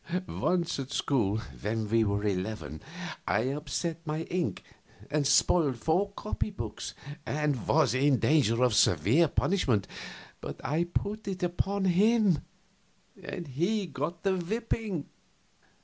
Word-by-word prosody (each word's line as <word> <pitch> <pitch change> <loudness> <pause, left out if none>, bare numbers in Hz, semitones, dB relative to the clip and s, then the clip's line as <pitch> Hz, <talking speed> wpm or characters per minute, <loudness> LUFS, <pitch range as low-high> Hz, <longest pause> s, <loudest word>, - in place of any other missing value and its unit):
Once 175 -5 0
at 135 -1 -4
school, 110 -10 +1 0.2
when 110 +1 -1
we 115 +1 +3
were 100 -1 0
eleven, 95 -5 -3 0.5
I - - +2
upset 150 +3 -2
my 155 0 -2
ink 175 -1 -2 0.5
and 150 -2 +2
spoiled 140 -1 +4
four 170 - +1
copy 215 +1 -3
books, 115 - -6 0.3
and 150 -6 -1
was 155 -3 +4
in 135 +1 +3
danger 125 -6 +3
of 125 -3 +3
severe 105 - +4
punishment; 130 - +1 0.5
but - - -6
I 160 +4 +1
put 205 +5 -3
it 185 -1 -3
upon 190 +3 0
him, 200 -1 +4 0.8
and 175 - -6
he 175 - 0
got 155 +2 -4
the 195 -1 +2
whipping. 205 -2 -2
150 Hz, 130 wpm, -29 LUFS, 125-180 Hz, 0.8 s, spoiled